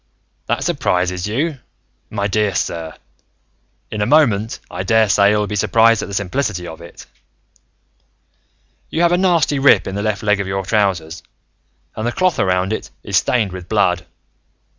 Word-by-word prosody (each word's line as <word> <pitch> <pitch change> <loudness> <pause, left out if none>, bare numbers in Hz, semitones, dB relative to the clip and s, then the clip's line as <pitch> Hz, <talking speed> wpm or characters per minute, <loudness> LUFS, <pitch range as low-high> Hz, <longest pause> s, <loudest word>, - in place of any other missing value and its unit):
"That - - -1
surprises 90 0 -1
you, 140 +7 -2 0.5
my 100 - -2
dear 105 -1 0
sir? 80 -3 -3 1.0
In 105 - -3
a 105 - +1
moment, 115 -7 +2
I - - -4
daresay 105 -3 +3
you'll 105 0 +1
be 105 - -4
surprised 115 +2 +3
at - - -5
the 100 - -6
simplicity 100 -1 -2
of 80 -1 -9
it. 85 - -12 1.8
"You 165 - 0
have 170 - +4
a 175 - +3
nasty 170 -6 +2
rip 140 +1 +5
in 95 - -5
the 100 - -3
left 105 0 -2
leg 105 -1 +2
of 100 - -3
your 95 0 -3
trousers, 95 -6 0 0.7
and 110 +2 -3
the - - 0
cloth 185 +4 0
around 95 +1 +1
it - - -5
is - - 0
stained 110 -6 +1
with 90 -1 -9
blood. 90 -5 +1
105 Hz, 160 wpm, -18 LUFS, 95-115 Hz, 1.8 s, rip